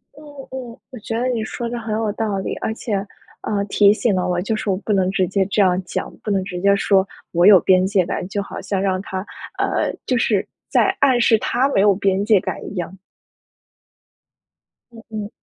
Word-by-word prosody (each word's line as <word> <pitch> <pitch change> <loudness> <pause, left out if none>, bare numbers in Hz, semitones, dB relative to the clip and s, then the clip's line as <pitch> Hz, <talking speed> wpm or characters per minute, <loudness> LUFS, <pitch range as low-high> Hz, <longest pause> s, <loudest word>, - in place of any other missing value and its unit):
嗯 300 - -14 0.3
嗯， 250 -3 -7
我 250 - -9
觉 225 +2 -4
得 250 - 0
你 230 -3 -1
说 235 +2 -4
的 240 0 -4
很 220 -1 -4
有 220 -2 -1
道 210 -2 -2
理。 190 - -3
而 220 - -3
且， 220 -1 -5 0.5
呃， 205 -1 -1
提 200 0 +4
醒 220 0 0
了 185 - 0
我， 180 -1 0
就 220 +3 -1
是 215 - -3
我 185 - +1
不 210 +1 -2
能 190 -1 +2
直 190 -1 +1
接 190 +1 +1
这 205 - -1
样 185 -1 +3
讲， - - -5
不 - - -4
能 195 -2 +1
直 180 -2 -6
接 200 0 +4
说 195 -1 +2 0.2
“我 175 +1 +3
有 195 -4 +9
边 185 +1 +3
界 190 -3 +2
感”， 180 -1 -3
就 200 0 -2
好 - - -8
像 195 -2 -2
让 190 -1 0
他 190 0 -5 0.3
呃， - - 0
就 255 - 0
是 210 -4 +1 0.2
在 - - +2
暗 260 -3 +4
示 225 -1 +4
他 255 +5 +1
没 195 - +2
有 200 -2 +4
边 195 0 +1
界 210 -2 +4
感 - - -5
一 - - -9
样。 180 +1 -5 1.9
嗯 230 - -13
嗯。 215 -1 -5
200 Hz, 235 characters per minute, -20 LUFS, 190-225 Hz, 1.9 s, 有